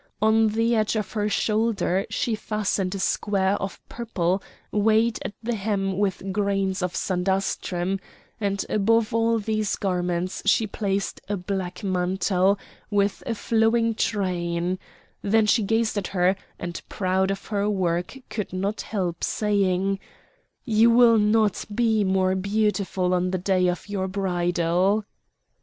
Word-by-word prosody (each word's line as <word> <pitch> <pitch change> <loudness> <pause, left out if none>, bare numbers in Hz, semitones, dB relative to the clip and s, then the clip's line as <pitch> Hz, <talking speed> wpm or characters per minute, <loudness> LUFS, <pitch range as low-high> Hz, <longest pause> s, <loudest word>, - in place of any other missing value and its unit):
On 220 +1 +4
the 225 +2 +1
edge 215 0 +1
of 210 -3 -2
her 210 -1 -1
shoulder 210 -4 +1
she 235 - -1
fastened 205 -3 -1
a - - -2
square 195 0 +1
of 195 - -4
purple 195 -5 -1 0.3
weighted 220 +2 +2
at - - -4
the 240 +2 -1
hem 195 -2 -1
with 195 -1 -1
grains 195 -1 0
of 180 -1 -2
sandastrum; 190 0 -1 0.4
and 200 -2 -1
above 220 +2 +2
all 230 0 +2
these 215 -1 -1
garments 180 -1 -1
she 220 +2 +4
placed 200 -1 -2
a 205 - 0
black 180 0 -4
mantle 190 +1 +1 0.3
with 200 -1 +1
a 230 - -1
flowing 225 +1 +2
train; 180 -4 -1 0.4
then 220 +2 +3
she 220 +2 +3
gazed 225 +2 +1
at 195 - -4
her, 185 0 +2 0.2
and 175 -1 -5
proud 190 -1 0
of 195 0 -3
her 205 -1 0
work 180 +2 -1
could 210 - -3
not 195 +3 -2
help 180 -5 -3
saying: 195 -2 +1 0.7
"You 225 -1 +4
will 230 -1 +6
not 210 -1 +2
be 225 -2 +2
more 190 -1 +2
beautiful 200 -2 0
on 180 0 +1
the 185 - -1
day 185 0 +2
of 180 +2 -2
your 195 -2 -2
bridal!" 180 +1 +1
200 Hz, 140 wpm, -25 LUFS, 185-215 Hz, 0.7 s, will